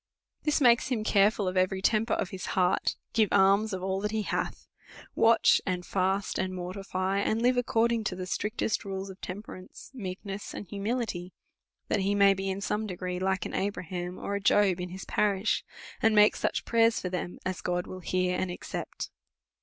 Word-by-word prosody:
This 300 0 +2
makes 240 -4 +5
him 245 -5 -1
careful 205 -1 +3
of 185 - -2
every 185 +1 +2
temper 215 +3 +2
of 180 - -2
his 185 -1 -6
heart, 180 -1 +2 0.2
give 220 -3 +3
alms 200 +2 +4
of 185 -1 -4
all 190 0 -1
that 210 - -1
he 215 0 -1
hath, - - -3 0.5
watch, 230 +1 +5
and 180 -2 -2
fast, 190 +2 0
and 185 0 -2
mortify, 185 +1 -2
and 220 +2 +1
live 250 +2 +3
according 235 -2 +1
to 185 - -1
the 185 0 -5
strictest 210 +3 -1
rules 195 0 -5
of 190 - -15
temperance, 185 +1 -9
meekness, 195 -3 -6
and - - -6
humility, 200 -3 -3 0.5
that - - +1
he 200 +1 +1
may 200 -1 +6
be 195 0 -3
in 190 +1 -3
some 210 +2 -1
degree 180 -1 -4
like 190 0 0
an - - -5
Abraham, 180 -2 -3
or 200 - -4
a 200 - -1
Job, 195 -2 +3
in 180 - -4
his 190 +2 -8
parish, 200 0 +1 0.4
and 225 -1 +4
make 210 0 +6
such - - -1
prayers 230 -1 +3
for 180 - -3
them 180 -1 -4
as 185 -1 -3
God 180 0 -1
will 185 - -8
hear 185 +1 0
and 185 - -1
accept. 175 - -6
195 Hz, 190 wpm, -29 LUFS, 185-215 Hz, 0.5 s, may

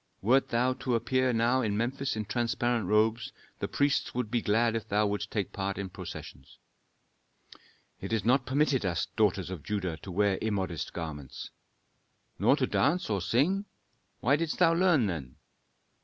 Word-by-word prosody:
Wert 130 +6 +3
thou 125 +2 +2
to 130 -1 -1
appear 130 +3 +1
now 120 +3 +2
in 105 -4 -1
Memphis 130 +4 -1
in 110 -1 -3
transparent 120 -2 0
robes, 110 +3 +2 0.3
the - - -2
priests 140 -3 0
would 125 -4 -2
be 120 - +1
glad 115 +2 +2
if 110 -2 -3
thou 105 +1 +2
wouldst 100 0 -2
take 105 -4 -3
part 100 0 -3
in 100 -2 -5
processions." - - -9 1.4
"It - - -6
is 110 -3 0
not 125 +1 +3
permitted 140 -1 +2
us 85 -4 0
daughters 100 -4 +1
of 90 -5 -6
Judah 95 -3 -3
to 90 - -11
wear 100 +1 +1
immodest 95 -6 -2
garments." 75 -6 -7 0.9
"Nor - - +5
to - - +1
dance 160 -4 +1
or 100 -2 0
sing? 170 - +1 0.6
Why 140 +5 +4
didst 165 0 -2
thou 165 -2 +5
learn, 170 -7 +3
then?" 75 -10 -4
115 Hz, 165 wpm, -29 LUFS, 100-130 Hz, 1.4 s, Nor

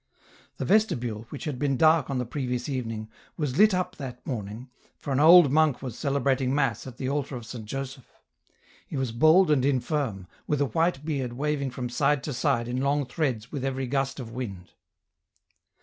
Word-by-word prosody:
The - - -3
vestibule, 120 - +1
which 145 - -7
had 145 -5 -4
been 140 -2 +1
dark 155 -2 +4
on 135 - -1
the 125 - -1
previous 125 -1 -3
evening, 115 -6 -4 0.3
was 145 -1 -2
lit 215 +1 +7
up 180 0 -2
that 130 -4 -8
morning, 115 +1 -5 0.3
for 140 - -4
an 135 - +1
old 165 -1 +8
monk 150 -3 +2
was 125 -4 -5
celebrating 135 -2 0
mass 140 -2 0
at 125 -2 -10
the 130 - -3
altar 140 0 -2
of 120 -2 -7
St. 110 -1 -8
Joseph. 135 +2 -6 0.8
He - - -5
was 130 -3 -1
bald 155 +8 +5
and 140 -4 +3
infirm, 130 - -1 0.2
with 150 - 0
a 145 - +3
white 155 +2 0
beard 135 -6 -2
waving 140 +1 -1
from 125 0 -4
side 135 +4 +1
to 150 - -3
side 120 -1 0
in 125 +1 -2
long 140 +1 +1
threads 125 -5 -2
with 140 -4 -4
every 135 0 -2
gust 135 +1 -1
of 115 -3 -7
wind. 100 -7 -6
135 Hz, 190 wpm, -27 LUFS, 125-145 Hz, 0.8 s, old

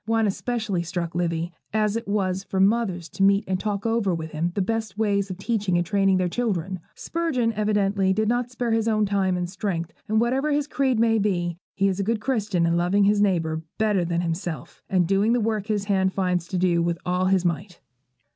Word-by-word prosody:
One 225 0 +2
especially 215 -2 -1
struck 170 0 -4
Livy, 170 0 -1 0.2
as 215 -1 +1
it 230 0 -3
was 190 -2 0
for 190 - -3
mothers 195 -4 +2
to - - -7
meet 200 +1 +4
and 185 0 -1
talk 205 0 -2
over 225 -5 +1
with 160 -1 -6
him 165 +3 -1
the 200 - +1
best 220 -1 -3
ways 200 -2 +1
of 185 - -5
teaching 200 -3 0
and 175 - +1
training 195 +1 +2
their 185 -1 +1
children. 190 -3 -2 0.2
Spurgeon 280 -9 -1
evidently 200 -2 +1
does 215 +3 +1
not 240 +1 0
spare 245 -1 -2
his 225 0 +1
own 215 -1 +2
time 195 -2 +1
and 180 0 -2
strength; 180 -3 -3
and 215 +1 +2
whatever 260 +6 +1
his 290 0 +1
creed 265 -3 +1
may 225 -1 +3
be, 175 -4 -1 0.2
he 195 0 +2
is 190 0 -1
a - - +1
good 225 +2 0
Christian 210 -8 0
in 170 0 +2
loving 180 +4 +2
his 205 +1 +3
neighbour 165 -5 +1 0.2
better 210 -4 +2
than 170 0 -1
himself, 165 -3 -4
and 185 -2 +3
doing 200 +4 +3
the 245 - +2
work 215 -2 -1
his 210 -2 -1
hand 190 -2 +1
finds 180 -3 0
to 185 - -3
do 175 -1 +2
with 170 0 0
all 180 +1 +1
his 185 -1 +2
might. 175 +2 -2
195 Hz, 215 wpm, -24 LUFS, 180-220 Hz, 0.2 s, meet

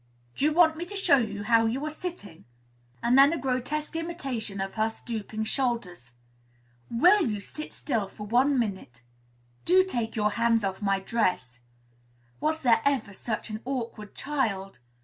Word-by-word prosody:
"Do 280 - 0
you 305 - +4
want 320 -1 +4
me 345 - -4
to 405 - -8
show 385 -7 +4
you 210 -3 -3
how 225 +1 +4
you 260 +6 -2
are 305 - -3
sitting?" 310 - -7 0.6
and 240 - +3
then 275 +2 +7
a 335 - -1
grotesque 275 +4 -2
imitation 270 - -4
of 195 0 -3
her 220 0 +1
stooping 220 -1 -5
shoulders. 215 - -2 0.7
"Will 360 - +5
you 210 -2 -2
sit 305 +9 -7
still 225 -8 -2
for 210 +2 -9
one 255 +6 +3
minute?" 190 - -3 0.6
"Do 370 +2 +5
take 240 -12 -3
your 210 -1 +1
hands 230 0 +2
off 195 +1 -2
my 195 -1 +1
dress." 180 - -1 0.8
"Was 315 0 -1
there 230 -3 +4
ever 265 -8 0
such 220 +2 -4
an 215 +1 -5
awkward 235 -5 -5
child?" 200 - -2
230 Hz, 165 wpm, -27 LUFS, 205-285 Hz, 0.8 s, then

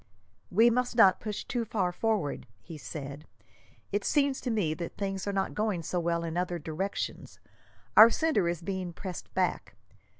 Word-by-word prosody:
"We 225 +6 +5
must 250 0 0
not 195 -6 +6
push 210 -2 -4
too 240 -2 -2
far 200 -5 -1
forward," 195 - -1
he 165 - -10
said. 145 0 -8 0.6
"It 205 0 0
seems 280 -2 +1
to 250 - -3
me 205 -9 +1
that 170 +1 -6
things 195 -1 -3
are - - +1
not 195 -1 -1
going 210 -6 -1
so 175 +3 -1
well 170 0 0
in 165 0 -3
other 180 -1 -1
directions. 165 +5 -4 0.6
Our 220 +2 +11
centre 300 - +1
is 170 0 -3
being 185 -1 -4
pressed 180 0 -7
back. - - -1
190 Hz, 170 wpm, -29 LUFS, 170-220 Hz, 0.6 s, Our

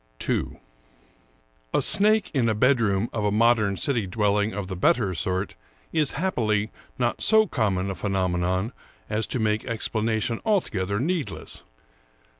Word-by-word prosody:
II - - -2 1.2
A - - +4
SNAKE 210 -1 +4
in 125 -5 +2
a 110 - +1
bedroom 115 -4 +2
of 110 - -2
a 105 - +1
modern 110 -2 +3
city 120 -8 -1
dwelling 105 +1 +1
of 100 -2 -4
the 95 0 -5
better 95 +2 +2
sort 95 +4 -2 0.4
is, 150 -3 +1
happily, 110 - 0 0.3
not 120 -1 -1
so 220 0 +5
common 100 - -1
a - - -3
phenomenon 95 +1 -1 0.4
as 110 +1 -1
to - - -2
make 110 -1 0
explanation 110 0 -1
altogether 100 - 0
needless. 160 +2 -3
110 Hz, 135 wpm, -25 LUFS, 100-125 Hz, 1.2 s, so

